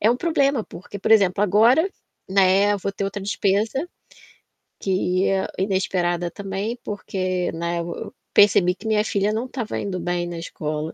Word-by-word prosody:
é 215 - +4
um 245 - 0
problema, 280 -7 +1
porque, 200 +2 -10
por 195 - 0
exemplo, 200 -2 +4
agora, 230 - +4 0.4
né, 195 +1 +4
vou 195 +1 -3
ter 200 0 -4
outra 200 +1 -3
despesa 205 - 0 0.9
que 185 -1 0
é 195 -1 +1
inesperada 180 -3 0
também, 200 +5 -4
porque, 185 -3 -2
né, 170 +1 -2
eu - - -5 0.2
v - - -10 0.2
percebi 190 -3 +5
que 220 - -9
minha 215 -1 +2
filha 200 0 0
não 225 +3 -2
estava 245 -4 -4
indo 190 -2 -3
bem 175 0 -2
na 170 -1 -5
escola. 155 -1 -4
195 Hz, 165 wpm, -23 LUFS, 180-215 Hz, 0.9 s, percebi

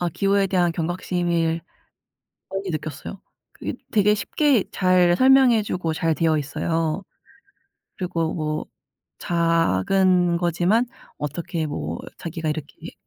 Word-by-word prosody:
아 175 - 0
기후에 195 +3 +1
대한 180 -2 +1
경각심을 170 -1 -1 0.9
많이 195 0 -4
느꼈어요. 155 +4 -6 0.3
그게 - - -5 0.2
되게 210 -1 +4
쉽게 270 0 +1
잘 180 -2 +3
설명해 260 -4 +6
주고 170 -5 -2
잘되어 160 -1 +1
있어요. 160 +4 -2 0.9
그리고 165 -3 -2
뭐 155 -2 -2 0.5
작은 170 - +2
거지만 175 +7 +2 0.3
어떻게 160 +2 -3
뭐 80 - -4 0.2
자기가 165 -2 -4
이렇게 150 -1 -5
했 - - -10
170 Hz, 250 characters per minute, -23 LUFS, 160-190 Hz, 0.9 s, 설명해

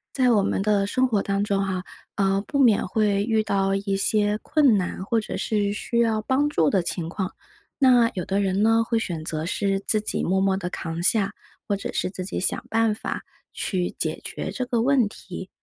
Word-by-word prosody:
在 255 -2 +3
我 205 -3 +3
们 - - 0
的 205 -1 +2
生 255 +4 +2
活 210 -5 0
当 200 0 -1
中 195 -1 0
啊， 185 -1 -2 0.3
呃， 195 0 +1
不 280 - -2
免 230 -6 +4
会 205 0 +1
遇 220 -1 +1
到 195 -1 0
一 195 0 -1
些 205 +1 +2
困 290 -7 +3
难， 185 0 -3
或 225 +2 +1
者 - - -5
是 205 -2 0
需 235 +3 -2
要 225 -2 +2
帮 265 +6 +1
助 160 - +2
的 190 -3 +1
情 170 -1 -2
况。 185 +2 -4 0.5
那 250 -4 +5
有 180 - -4
的 195 +1 0
人 195 0 0
呢， 225 +1 +4
会 230 0 0
选 170 -7 -4
择 155 0 -2
是 195 +2 0
自 210 +2 +2
己 215 - -1
默 190 +2 +1
默 195 0 +2
地 180 -2 -4
扛 165 -1 -5
下， 200 +2 +2 0.3
或 200 - -1
者 - - -6
是 - - -1
自 185 -1 -6
己 190 - -4
想 - - +1
办 225 -1 +2
法 210 - -5 0.3
去 180 -3 -2
解 - - -2
决 - - -5
这 255 - -3
个 240 -2 0
问 255 -2 +3
题。 185 -2 -9
200 Hz, 230 characters per minute, -24 LUFS, 190-225 Hz, 0.5 s, 那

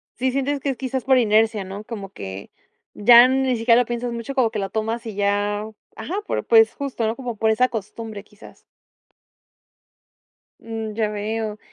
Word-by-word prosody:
Sí, 260 +1 0
sientes 275 +2 -1
que 280 - -3
es 265 - -2
quizás 260 -1 -3
por 265 -1 +4
inercia, 220 -2 +2
¿no? 195 +2 -8
Como 210 -3 -7
que 95 - -8 0.4
ya 235 +3 +7
ni 260 -1 +1
siquiera 230 +1 +4
lo - - -1
piensas 240 0 -3
mucho, 235 +4 -6
como 240 -4 +2
que 220 - -3
lo 195 -1 -3
tomas 225 +3 -3
y 220 -3 -6
ya 205 +1 0 0.3
ajá, 220 +12 -6
por - - -2
pues 450 -1 +5
justo, 275 -5 -3
¿no?, 220 - -1
como 245 -3 -5
por 220 +1 +1
esa 250 +3 +2
costumbre 220 -1 -6
quizás. 210 +1 -17 2.0
Mm, 225 -1 -5
ya 220 -1 0
veo. 215 +1 -3
225 Hz, 180 wpm, -22 LUFS, 210-250 Hz, 2.0 s, ya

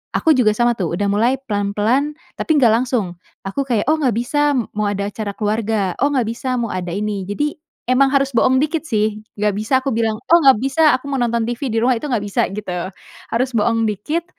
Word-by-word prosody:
aku 320 - +3
juga 215 -5 +3
sama 240 +1 +2
tuh, 185 -6 -2
udah 205 - -1
mulai 235 +6 +2
pelan-pelan, 215 +8 0 0.2
tapi 315 - +1
gak 240 -6 +5
langsung. 230 -7 0 0.3
Aku 195 +9 -2
kayak, 235 -5 0
"Oh - - +4
nggak 255 -7 +1
bisa 290 +5 +1
m 240 - -1
mau 210 0 -1
ada 200 0 -2
acara 205 -2 -5
keluarga," 210 -3 -1
"Oh 285 - +4
nggak 250 -5 +1
bisa 255 +2 -3
mau 230 -3 -2
ada 180 -1 -4
ini." 205 -2 -3
Jadi 295 +9 -1 0.4
emang 270 +2 +4
harus 275 -1 +2
bohong 255 +2 +3
dikit 310 +1 -1
sih. 215 -2 0 0.2
Gak 210 0 +1
bisa 220 +6 +1
aku 275 - -1
bilang, 225 -1 0 0.2
"Oh 340 - +8
nggak 270 -4 +7
bisa, 305 +2 +4
aku 280 +2 -6
mau 270 - -1
nonton 235 -1 0
TV 245 +3 -3
di - - 0
rumah," 255 0 +3
itu 295 - -5
nggak 225 -5 0
bisa 200 - 0
gitu. 185 -3 -4 0.4
Harus 255 +3 0
bohong 225 0 +1
dikit, 295 - -2
230 Hz, 215 wpm, -19 LUFS, 210-265 Hz, 0.4 s, Oh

